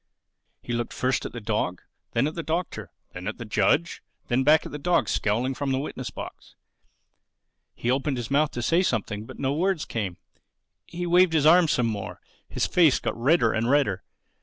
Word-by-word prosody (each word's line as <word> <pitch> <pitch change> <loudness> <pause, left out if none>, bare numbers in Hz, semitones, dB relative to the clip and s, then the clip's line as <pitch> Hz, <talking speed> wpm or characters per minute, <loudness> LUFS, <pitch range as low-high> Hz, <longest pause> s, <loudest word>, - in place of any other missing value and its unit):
He 120 - -4
looked 120 0 -2
first 130 +1 0
at - - -12
the 120 - -6
dog, 105 -5 -2 0.3
then 115 +3 +2
at 155 - -2
the 165 - -4
Doctor, 165 +2 -3 0.2
then 90 0 -7
at 110 - -4
the 115 - -7
judge, 170 +9 +1 0.3
then 130 +1 +2
back 155 +3 +4
at - - -7
the 150 - -6
dog 175 +4 +1
scowling 120 +6 0
from 140 +1 -2
the 130 - +1
witness 140 - -4
box. - - -10 1.2
He 120 - -1
opened 135 +1 0
his 120 0 -5
mouth 145 +1 +3
to 120 - -4
say 165 +9 +3
something; 110 - -2
but - - -10
no 135 0 -1
words 180 +1 0
came. 95 -6 -4 0.7
He 175 +1 -5
waved 175 0 +4
his 155 -2 +2
arms 165 0 +6
some 125 - +1
more. 105 -3 -4 0.3
His - - -1
face 165 -7 +4
got - - -3
redder 120 -1 +3
and 115 +1 0
redder. 135 -10 +2
135 Hz, 195 wpm, -25 LUFS, 115-160 Hz, 1.2 s, arms